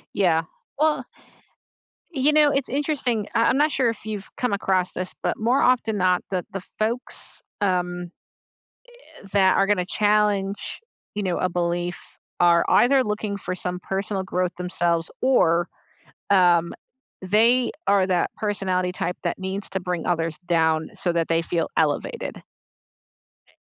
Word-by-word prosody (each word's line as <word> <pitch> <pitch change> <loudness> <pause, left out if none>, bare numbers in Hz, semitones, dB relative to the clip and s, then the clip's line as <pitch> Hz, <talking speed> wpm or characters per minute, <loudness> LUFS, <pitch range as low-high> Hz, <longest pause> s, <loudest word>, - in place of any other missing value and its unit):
Yeah. 165 -5 +3 0.4
Well 300 -4 +2 1.1
you 285 0 +3
know, 300 -1 +5
it's 275 -1 -1
interesting, 265 -6 -1
I 230 - +4
I'm 265 - +3
not 300 +1 +3
sure 255 -2 +2
if 225 -2 -5
you've 210 -2 -5
come 250 -4 0
across 190 -2 +1
this, 185 0 -3
but - - 0
more 240 +5 +2
often 235 -4 +2
not, 180 -1 +2
the 185 -2 -2
the 195 - -5 0.2
folks, 230 +4 -3 0.2
um, 180 -2 -1 0.9
eh 200 - -17
that 190 -2 +4
are 195 - +3
gonna 195 -3 +1
challenge, 205 -1 0 0.3
you 205 - -2
know, 180 -2 -1
a 185 - +1
belief 175 0 -2 0.4
are 170 -1 +5
either 265 +1 +4
looking 210 -1 -2
for 185 - -4
some 180 0 -4
personal 195 +1 -2
growth 180 -1 -2
themselves 175 -2 0
or, 175 -10 +3 0.6
um, 175 -3 +4 0.5
they 230 +6 +3 0.2
are 200 -2 +4
that 180 -2 +1
personality 185 -4 -1
type 180 0 -3
that - - -2
needs 190 +2 -4
to 190 - -2
bring 180 -2 -3
others 165 -2 -1
down 160 -2 +1
so 175 - 0
that 170 -1 0
they 165 0 +2
feel 165 0 -1
elevated. 485 +1 -1 1.0
Eh, - - -28
190 Hz, 150 wpm, -23 LUFS, 175-220 Hz, 1.1 s, know